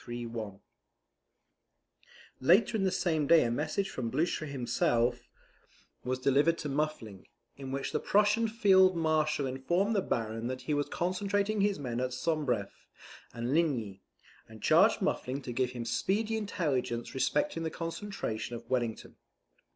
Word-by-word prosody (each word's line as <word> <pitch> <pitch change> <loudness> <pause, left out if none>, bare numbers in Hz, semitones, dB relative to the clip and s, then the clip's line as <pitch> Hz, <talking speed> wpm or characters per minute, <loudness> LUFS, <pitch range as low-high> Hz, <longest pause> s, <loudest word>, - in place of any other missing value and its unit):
] 120 - -7 2.2
Later 180 - +4
in 195 -3 +1
the - - +3
same 160 -6 0
day 165 +1 +6
a 115 - 0
message 155 +9 -1
from 120 -3 -3
Blucher 155 +4 -1
himself 120 -2 0 0.7
was 130 +1 -1
delivered 140 +6 +3
to 150 - -4
Muffling, 135 -9 -3 0.3
in 135 -1 -7
which 135 0 -3
the - - 0
Prussian 210 +3 +3
Field 190 -5 +4
Marshal 155 -3 +1
informed 175 +12 0
the 200 - +3
Baron 115 -5 -2
that 130 0 -4
he 150 - -1
was 145 0 -1
concentrating 200 +3 0
his 200 0 +2
men 125 -4 -4
at 125 0 -2
Sombref 130 -7 -2 0.4
and 120 +3 -3
Ligny, 120 - 0 0.5
and - - -13
charged - - +4
Muffling 130 +2 -1
to 125 - -5
give 125 +1 0
him 120 -2 -5
speedy 215 - 0
intelligence 150 - -2
respecting 165 - 0
the 165 - -1
concentration 165 - -4
of 115 0 -10
Wellington. 120 -3 -2
145 Hz, 145 wpm, -30 LUFS, 125-185 Hz, 2.2 s, day